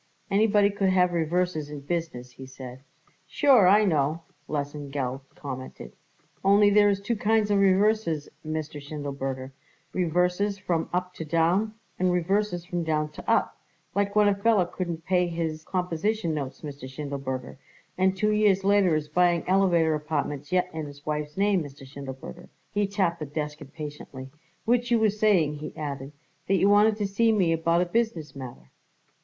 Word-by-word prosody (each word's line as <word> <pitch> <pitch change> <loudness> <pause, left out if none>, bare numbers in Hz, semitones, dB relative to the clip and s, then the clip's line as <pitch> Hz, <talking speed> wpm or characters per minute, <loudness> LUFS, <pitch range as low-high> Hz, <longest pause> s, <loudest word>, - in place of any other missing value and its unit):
"Anybody 205 0 +4
could 195 -1 +1
have 180 -1 +3
reverses 170 -2 0
in 145 -1 -7
business," 145 -5 -4
he 130 +2 -11
said. 130 -1 -10 0.5
"Sure, 260 - +5
I 210 +3 +6
know," 155 -2 +1 0.3
Lesengeld 140 -3 -3
commented. 130 - -8 0.5
"Only 205 +1 +5
there 205 0 +5
is 200 -1 +1
two 215 +4 -2
kinds 215 0 +1
of 200 - +3
reverses, 195 -5 +2 0.2
Mr. 155 -1 -4
Schindelberger, 140 -2 -5 0.4
reverses 180 +3 +1
from 175 -4 -2
up 180 0 -2
to 160 - -6
down 170 +7 +1 0.2
and 185 0 +2
reverses 180 0 0
from 175 -2 -2
down 155 -1 0
to - - -8
up, - - +1 0.3
like 200 +1 0
when 210 -1 +5
a 205 - +4
feller 200 -1 +2
couldn't 170 -2 -5
pay 180 -1 +2
his 165 -2 -3
composition 180 +1 -1
notes, 140 -3 -5
Mr. 140 -3 -8
Schindelberger, 135 -2 -5 0.4
and 190 +1 +2
two 210 +2 +2
years 210 -2 +3
later 195 -4 +4
is 155 -1 -2
buying 175 +2 +2
elevator 180 -4 +3
apartments 150 -1 -3
yet 180 0 +2
in 160 -2 -4
his 145 0 -13
wife's 150 0 -3
name, 200 -2 +2
Mr. 140 -1 -11
Schindelberger." 130 - -9 0.2
He 205 -1 0
tapped 190 -4 0
the 155 - -5
desk 150 0 -4
impatiently. 140 -2 -8 0.3
"Which 240 +1 +2
you 240 - +4
was 215 -1 +1
saying," 175 -9 +3
he 150 - -8
added, 140 -2 -5 0.4
"that 195 - +3
you 195 - +3
wanted 210 +1 +5
to 205 -2 -1
see 225 +4 +2
me 185 -6 +2
about 165 +1 +2
a - - +2
business 180 -7 -2
matter." 120 - -10
170 Hz, 165 wpm, -26 LUFS, 145-200 Hz, 0.5 s, I